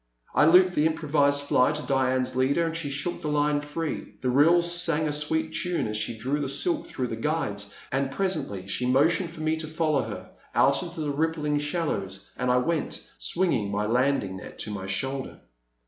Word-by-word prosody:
I -, -, +5 dB
looped 180 Hz, +3 st, +6 dB
the 155 Hz, -2 st, +3 dB
improvised 145 Hz, -3 st, +2 dB
fly 145 Hz, 0 st, +3 dB
to 150 Hz, 0 st, -4 dB
Diane's 130 Hz, -1 st, 0 dB
leader, 140 Hz, +6 st, +2 dB
and 165 Hz, 0 st, -3 dB
she 165 Hz, -4 st, -3 dB
shook 145 Hz, +5 st, -3 dB
the -, -, -4 dB
line 150 Hz, 0 st, +1 dB
free. 150 Hz, +1 st, -5 dB
The 125 Hz, -, 0 dB
reel 165 Hz, +6 st, +5 dB
sang 170 Hz, -3 st, +1 dB
a -, -, -1 dB
sweet 160 Hz, +2 st, 0 dB
tune 180 Hz, -1 st, -1 dB
as 105 Hz, -, -3 dB
she 110 Hz, +2 st, -2 dB
drew 135 Hz, +6 st, -1 dB
the 140 Hz, -2 st, -2 dB
silk 315 Hz, -, 0 dB
through 130 Hz, -, -3 dB
the -, -, -4 dB
guides, 105 Hz, -10 st, -2 dB, 0.2 s
and 135 Hz, +1 st, 0 dB
presently 140 Hz, -, -2 dB
she 125 Hz, +6 st, -1 dB
motioned 165 Hz, +6 st, +2 dB
me 155 Hz, 0 st, 0 dB
to 160 Hz, 0 st, -4 dB
follow 155 Hz, -3 st, +1 dB
her -, -, -7 dB, 0.2 s
out 140 Hz, -, +4 dB
into 170 Hz, -2 st, -6 dB
the 150 Hz, -1 st, -1 dB
rippling 150 Hz, 0 st, 0 dB
shallows, 125 Hz, -, -3 dB
and 125 Hz, -, -1 dB
I 125 Hz, -, +4 dB
went, 155 Hz, +5 st, -2 dB
swinging 120 Hz, -, 0 dB
my 105 Hz, +1 st, -1 dB
landing 120 Hz, -4 st, +1 dB
net -, -, -10 dB
to 105 Hz, -, -4 dB
my 95 Hz, -2 st, -5 dB
shoulder. 135 Hz, +8 st, -3 dB
145 Hz, 195 wpm, -26 LUFS, 125-160 Hz, 0.2 s, looped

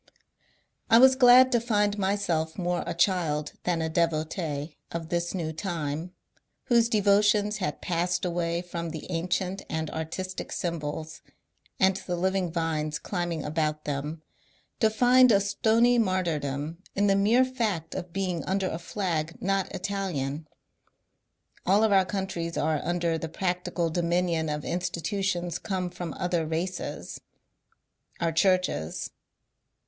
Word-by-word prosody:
I 225 Hz, -, +7 dB
was 260 Hz, +2 st, +7 dB
glad 255 Hz, 0 st, +7 dB
to 240 Hz, -, +4 dB
find 210 Hz, -3 st, +1 dB
myself 190 Hz, -5 st, 0 dB
more 175 Hz, -1 st, -1 dB
a 170 Hz, -, -3 dB
child 170 Hz, -5 st, +1 dB
than 170 Hz, -2 st, +1 dB
a -, -, 0 dB
devotee 160 Hz, -2 st, -1 dB, 0.2 s
of 165 Hz, -1 st, -5 dB
this 175 Hz, +1 st, -1 dB
new 160 Hz, -3 st, -3 dB
time, 165 Hz, -2 st, -3 dB, 0.5 s
whose 235 Hz, -1 st, +3 dB
devotions 210 Hz, 0 st, +3 dB
had 190 Hz, -, -3 dB
passed 175 Hz, +1 st, 0 dB
away 170 Hz, 0 st, -1 dB
from 170 Hz, -1 st, -5 dB
the 160 Hz, -1 st, -7 dB
ancient 180 Hz, +3 st, -1 dB
and 160 Hz, -1 st, -2 dB
artis 165 Hz, +4 st, -4 dB
tic -, -, -6 dB
symbols, 160 Hz, -2 st, -4 dB, 0.6 s
and 190 Hz, 0 st, +4 dB
the 185 Hz, -2 st, -4 dB
living 185 Hz, 0 st, 0 dB
vines 160 Hz, -2 st, -1 dB
climbing 175 Hz, -3 st, -3 dB
about 155 Hz, 0 st, -1 dB
them, 150 Hz, +2 st, -4 dB, 0.6 s
to 220 Hz, -, +4 dB
find 250 Hz, +3 st, +5 dB
a 200 Hz, -, +5 dB
stony 225 Hz, +4 st, +3 dB
martyrdom 165 Hz, -6 st, -1 dB, 0.2 s
in 200 Hz, -, +2 dB
the 195 Hz, -1 st, +4 dB
mere 225 Hz, +6 st, +4 dB
fact 215 Hz, -, -2 dB
of 175 Hz, -, -5 dB
being 185 Hz, -3 st, -2 dB
under 190 Hz, 0 st, 0 dB
a 160 Hz, -, -4 dB
flag 170 Hz, -3 st, -3 dB
not 195 Hz, 0 st, 0 dB
Italian. 165 Hz, -7 st, -3 dB, 1.2 s
All 200 Hz, +4 st, +4 dB
of 220 Hz, -, +3 dB
our 190 Hz, -1 st, +5 dB
countries 185 Hz, -4 st, -3 dB
are 155 Hz, -1 st, +1 dB
under 170 Hz, -2 st, 0 dB
the 165 Hz, -, -5 dB
practical 180 Hz, -1 st, -1 dB
dominion 170 Hz, -1 st, 0 dB
of 150 Hz, 0 st, -3 dB
institutions 180 Hz, 0 st, -2 dB
come 185 Hz, -3 st, -3 dB
from 175 Hz, -3 st, -6 dB
other 175 Hz, -2 st, 0 dB
races; 175 Hz, +3 st, -4 dB, 1.0 s
our 165 Hz, -1 st, +1 dB
churches. 180 Hz, -, +1 dB
175 Hz, 135 wpm, -27 LUFS, 160-195 Hz, 1.2 s, I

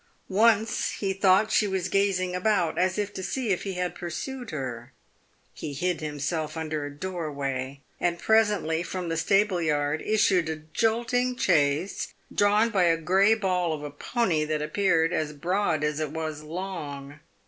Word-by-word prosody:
Once 220 Hz, +2 st, +2 dB
he 195 Hz, -2 st, -2 dB
thought 195 Hz, +2 st, +3 dB
she 210 Hz, -, +3 dB
was 190 Hz, -2 st, -1 dB
gazing 185 Hz, -2 st, +1 dB
about, 180 Hz, -3 st, +1 dB
as 185 Hz, +1 st, +1 dB
if 205 Hz, 0 st, -2 dB
to -, -, -5 dB
see 245 Hz, +5 st, -2 dB
if 190 Hz, +1 st, -1 dB
lie 195 Hz, -, -2 dB
had 180 Hz, -1 st, -2 dB
pursued 240 Hz, -, -6 dB
her. 130 Hz, -4 st, -5 dB, 0.6 s
He 150 Hz, -, -6 dB
hid 175 Hz, +4 st, -1 dB
himself 155 Hz, +1 st, -3 dB
under 155 Hz, -2 st, -3 dB
a 145 Hz, -, -4 dB
doorway, 140 Hz, -5 st, -4 dB, 0.2 s
and 175 Hz, -1 st, 0 dB
presently 205 Hz, -7 st, +2 dB
from 180 Hz, 0 st, -4 dB
the 165 Hz, -, -1 dB
stableyard 160 Hz, -6 st, +1 dB
issued 195 Hz, -6 st, +2 dB
a 160 Hz, -, -1 dB, 0.2 s
jolting 240 Hz, +2 st, +1 dB
chaise, 160 Hz, -, +1 dB, 0.2 s
drawn 210 Hz, +3 st, +3 dB
by 190 Hz, -5 st, +3 dB
a 165 Hz, -1 st, +3 dB
grey 190 Hz, +6 st, +4 dB
ball 180 Hz, -5 st, 0 dB
of 150 Hz, -1 st, -5 dB
a 145 Hz, -, -5 dB
pony 165 Hz, -, 0 dB
that 155 Hz, 0 st, -1 dB
appeared 165 Hz, 0 st, +2 dB
as 150 Hz, -1 st, -1 dB
broad 170 Hz, 0 st, 0 dB
as 150 Hz, 0 st, 0 dB
it 155 Hz, -2 st, -1 dB
was 155 Hz, -1 st, -4 dB
long. 150 Hz, -4 st, -6 dB
175 Hz, 160 wpm, -26 LUFS, 155-200 Hz, 0.6 s, grey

